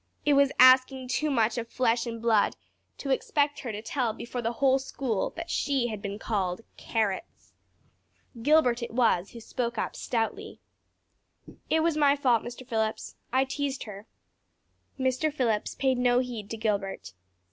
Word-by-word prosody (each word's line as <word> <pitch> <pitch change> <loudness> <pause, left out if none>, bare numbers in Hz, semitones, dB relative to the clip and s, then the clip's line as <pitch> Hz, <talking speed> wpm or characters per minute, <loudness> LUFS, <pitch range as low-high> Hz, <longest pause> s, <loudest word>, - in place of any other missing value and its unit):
It 295 - +4
was 280 -1 +4
asking 255 0 +6
too 305 +4 0
much 230 -3 +1
of 230 - -5
flesh 235 -1 +1
and 230 -1 -5
blood 225 -3 +2 0.4
to 275 - -4
expect 290 +2 +1
her 240 - -5
to 210 0 -6
tell 240 -2 -1
before 245 +2 -5
the 230 +1 -1
whole 270 +2 +3
school 260 -5 -2
that 335 +1 -6
she 270 -4 0
had 215 -2 -5
been 200 0 -4
called 195 -4 -2
"carrots." 220 - -3 0.9
Gilbert 255 -3 +3
it 235 - -4
was 220 -7 +2
who 235 - -8
spoke 235 +1 -3
up - - -2
stoutly. 255 - -3 1.1
"It 320 - +3
was 330 -2 +1
my 285 -2 +4
fault 250 -5 +2
Mr. 245 +1 -9
Phillips. 220 -3 -2 0.2
I 260 +2 +3
teased 270 0 -3
her." 210 -1 -10 0.9
Mr. 260 +4 +1
Phillips 235 -7 -1
paid 260 -2 +1
no 245 -1 +3
heed 240 -5 -3
to 225 - -4
Gilbert. 200 - -2
245 Hz, 160 wpm, -28 LUFS, 225-270 Hz, 1.1 s, asking